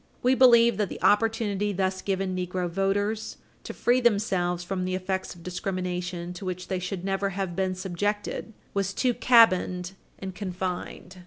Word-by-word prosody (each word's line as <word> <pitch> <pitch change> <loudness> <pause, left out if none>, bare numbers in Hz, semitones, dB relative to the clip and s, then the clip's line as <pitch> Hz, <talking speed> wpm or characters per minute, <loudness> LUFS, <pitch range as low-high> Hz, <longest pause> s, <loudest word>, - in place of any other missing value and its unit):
We 250 +1 +4
believe 235 -4 +6
that 210 -3 0
the - - -7
opportunity 210 -1 +2
thus 190 0 -1
given 190 -1 -1
negro 180 0 -2
voters 200 +4 -1 0.3
to - - -6
free 245 +1 +2
themselves 190 -6 +1
from 185 +1 -3
the 185 0 -1
effects 190 0 -3
of 170 - -15
discrimination 180 -1 -3
to 180 - -9
which 185 0 -5
they 185 - -1
should 180 0 -4
never 195 0 0
have 190 -3 -2
been 190 0 0
subjected 205 +4 -3 0.2
was 195 -1 -1
too 250 +3 +2
cabined 185 -7 +4 0.3
and 190 -1 -6
confined. 185 -1 -5
190 Hz, 160 wpm, -26 LUFS, 180-205 Hz, 0.3 s, believe